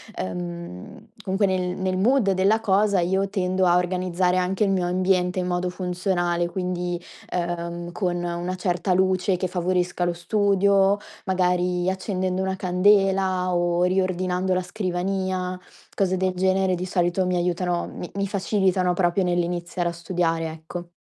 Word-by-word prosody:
ehm, 90 - -6
comunque 195 +1 +1
nel 180 -1 -1
nel 185 0 -1
mood 220 0 +3
della 195 +4 +2
cosa, 205 -1 +2
io 190 +3 +1
tendo 185 -1 0
a 175 0 +5
organizzare 180 0 0
anche 185 +3 +1
il 200 - +2
mio 185 -2 +1
ambiente 180 0 +1
in 180 - -1
modo 180 0 -1
funzionale, 180 -1 -1
quindi, 180 -1 -3 0.3
ehm 170 -1 -2 0.2
con 175 -1 -1
una 175 +1 -3
certa 180 0 0
luce 185 0 +2
che 185 +1 -1
favorisca 180 0 0
lo 175 - 0
studio, 200 +1 +3 0.3
magari 180 -1 +1
accendendo 185 -1 -2
una 190 0 -1
candela 190 0 +2
o 175 0 +1
riordinando 185 0 0
la 185 - +1
scrivania. 185 -1 -2 0.4
Cose 185 -1 +1
del 185 0 0
genere 190 0 +2
di 180 +1 -4
solito 180 0 +1
mi 180 0 0
aiutano, 175 0 -1
mi 175 - -7
mi 200 0 -1
facilitano 190 -2 +1
proprio 175 +1 +1
nell'iniziare 175 0 -1
a - - -3
studiare, 170 -1 -1
ecco. 165 +2 -8
180 Hz, 145 wpm, -24 LUFS, 175-190 Hz, 0.4 s, a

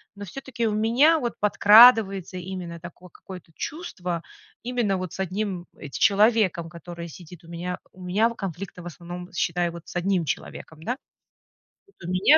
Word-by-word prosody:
Но 205 0 -7
всё-таки 235 +2 -4
у 215 - 0
меня 245 +10 +4
вот 240 -4 -2
подкрадывается 210 -3 +6
именно 180 -2 -6
такое 175 +2 -12
какое-то 180 -1 -12
чувство, 180 - -4 0.4
именно 235 -5 0
вот 185 -2 -5
с - - -9
одним 190 -1 -2
эт 145 -3 -10
человеком, 200 -5 +3
который 170 +1 -8
сидит 175 +1 -12
у - - -16
меня. 175 +2 -5
У 185 - -15
меня 200 +6 +2
конфликты 195 -4 -6
в - - -13
основном, 175 +2 -8
считай, 175 0 0
вот 170 0 -11
с - - -11
1 175 -1 +1
человеком, 160 +1 -6
да. 245 +8 -2 1.1
У - - -4
меня 185 +12 +6
185 Hz, 160 wpm, -25 LUFS, 175-215 Hz, 1.1 s, подкрадывается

